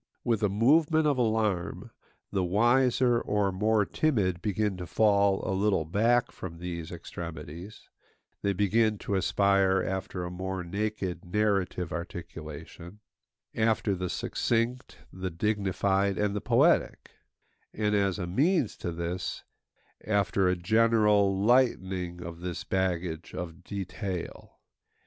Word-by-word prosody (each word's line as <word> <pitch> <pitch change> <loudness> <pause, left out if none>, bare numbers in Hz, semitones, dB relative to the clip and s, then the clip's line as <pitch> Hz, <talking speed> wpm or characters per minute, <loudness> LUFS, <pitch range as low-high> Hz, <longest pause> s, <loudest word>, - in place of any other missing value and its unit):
With 115 -2 +1
a 105 - +2
movement 150 - +3
of 145 -4 +2
alarm, 110 -6 -1 0.4
the 95 -2 0
wiser 120 +5 +3
or 105 -2 0
more 105 +2 +2
timid 100 - 0
begin 105 -1 0
to 90 -1 -6
fall 100 -2 +2
a - - 0
little 95 -4 +1
back 115 +8 +2
from 85 -3 -8
these 85 -2 -6
extremities; 90 +8 -8 0.5
they 100 - +1
begin 105 +3 +2
to 100 - -4
aspire 95 0 +2
after 95 -1 -3
a 90 - -5
more 95 0 -4
naked, 95 -1 -3
narrative 90 -2 0
articulation; 85 +1 -8 0.5
after 110 -2 +1
the 90 -1 -3
succinct, 120 +6 -1 0.2
the 95 0 -4
dignified, 100 +1 0
and 105 -1 0
the 105 - -2
poetic; - - +2 0.6
and 105 -1 -1
as 100 -2 +1
a 90 - -3
means 140 - +1
to 85 - -4
this, 85 +2 -4 0.6
after 100 -2 +2
a 90 - +2
general 105 0 +3
lightening 95 -7 +1
of 85 -1 -8
this 90 0 -5
baggage 90 -3 -2
of 90 0 -6
detail. 95 -1 -6
100 Hz, 125 wpm, -28 LUFS, 90-110 Hz, 0.6 s, movement